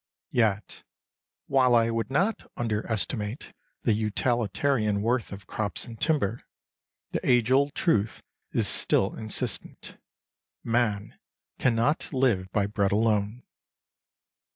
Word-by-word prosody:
Yet, 110 -5 0 0.6
while 130 -3 +4
I 115 0 +3
would 115 +1 -2
not 195 +11 0
under 115 -1 -2
estimate 110 - -3 0.3
the 115 - +3
utilitarian 110 0 0
worth 120 0 0
of 100 0 -9
crops 105 -2 -3
and 115 -1 -10
timber, 145 -9 +1 0.7
the - - -2
age 125 -1 +3
old 140 +2 +3
truth 110 - 0 0.3
is - - +2
still 95 - +3
insistent: 110 -2 -3 0.6
Man 115 -3 -1 0.4
cannot 125 +5 +1
live 115 -9 +1
by 100 -1 +1
bread 100 -1 0
alone. 110 +2 +1
115 Hz, 110 wpm, -27 LUFS, 105-125 Hz, 0.7 s, while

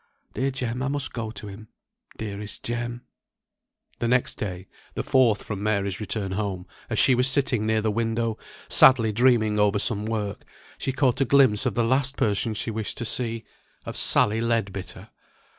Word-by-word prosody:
Dear 135 +1 0
Jem, 125 -2 -3
I 135 - -1
must 140 0 -1
go 115 -2 -4
to 110 - -9
him, 105 +2 -10 0.5
dearest 105 -1 -6
Jem." 120 +1 -4 1.0
The 120 - 0
next 125 +1 +1
day, 95 -3 -5 0.3
the - - -2
fourth 120 -6 +3
from 100 -2 -5
Mary's 100 -2 -1
return 105 -2 -3
home, 95 -2 -3 0.2
as - - -2
she 130 - +5
was 125 +1 +3
sitting 130 -5 +1
near 110 0 +2
the 110 0 0
window, 115 0 -1 0.3
sadly 115 -4 +6
dreaming 110 -2 +3
over 105 0 +3
some 105 +1 0
work, 105 -2 -3 0.4
she 135 - -1
caught 130 -1 +1
a - - +4
glimpse 130 -3 +4
of - - -2
the 120 - +2
last 130 +3 +1
person 110 +1 0
she 115 - -2
wished 110 -1 -3
to 120 - -3
see 115 -1 0 0.4
of - - -6
Sally 110 +2 +2
Leadbitter! 100 -5 -3
115 Hz, 175 wpm, -25 LUFS, 105-125 Hz, 1.0 s, sadly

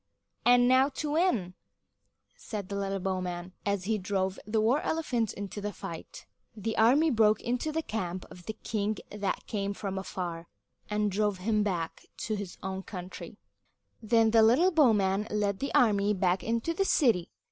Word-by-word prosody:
"And 245 0 +6
now 260 +2 +5
to 295 +1 -4
win!" 295 - +1 0.8
said 215 - -6
the 200 - -3
little 195 0 -1
bowman, 180 -1 -3
as 200 -2 0
he 215 +2 0
drove 190 0 -1
the 220 +1 +1
war 235 +7 +3
elephant 250 -9 -1
into 205 +1 -6
the 210 +1 -3
fight. - - -8 0.3
The 220 +2 -2
army 280 +8 +4
broke 215 -3 +4
into 250 +6 -2
the 320 +1 -2
camp 185 - -4
of 175 -1 -13
the 220 - -2
king 215 -1 -2
that 205 -1 -3
came 200 -2 -2
from 195 -2 -4
afar, 175 -3 -5 0.4
and 210 -1 0
drove 205 0 0
him 210 +3 +1
back 175 -5 -3 0.2
to 215 - -2
his 200 -3 -6
own 190 0 -3
country. 185 -2 -8 0.6
Then 225 0 +3
the 225 0 +6
little 255 +12 +5
bowman 210 - +3
led 205 -2 0
the 275 - -2
army 210 -3 +4
back 185 0 +1
into 230 +8 -1
the 390 - +1
city. 230 - +3
210 Hz, 170 wpm, -29 LUFS, 190-235 Hz, 0.8 s, And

